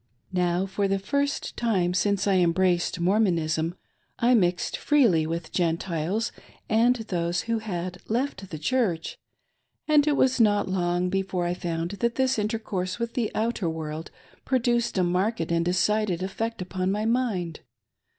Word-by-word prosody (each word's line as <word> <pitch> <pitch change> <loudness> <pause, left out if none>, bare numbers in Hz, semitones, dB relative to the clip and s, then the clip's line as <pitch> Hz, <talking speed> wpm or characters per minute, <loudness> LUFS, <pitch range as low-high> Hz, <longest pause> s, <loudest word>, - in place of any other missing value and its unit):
Now, 180 0 +1
for 195 +1 -1
the 195 0 +1
first 280 +8 -1
time 190 -7 +1
since 200 +1 +1
I 195 -2 +3
embraced 175 0 +2
Mormonism, 170 -4 +1 0.4
I 245 +1 +3
mixed 180 -6 +2
freely 225 - +3
with 165 0 -4
Gentiles 175 +4 -1 0.4
and 230 +3 +4
those 180 -6 -2
who 230 -1 -1
had 180 -4 -5
left 225 -5 -2
the 155 - -5
Church, 180 - -1 0.7
and 300 -1 +4
it 290 -2 +3
was 260 -1 +3
not 205 -2 +3
long 180 -1 0
before 190 -2 -1
I 175 - 0
found 170 -1 -3
that 235 0 +1
this 260 -2 +1
intercourse 210 -4 -2
with 235 0 -3
the 235 -4 0
outer 220 -5 0
world 160 0 -5 0.3
produced 240 -4 +1
a 185 - +3
marked 185 +6 0
and 170 0 +2
decided 185 +1 +1
effect 225 +2 -3
upon 185 +1 -2
my 210 +2 -1
mind. 220 -9 0
190 Hz, 150 wpm, -26 LUFS, 175-230 Hz, 0.7 s, and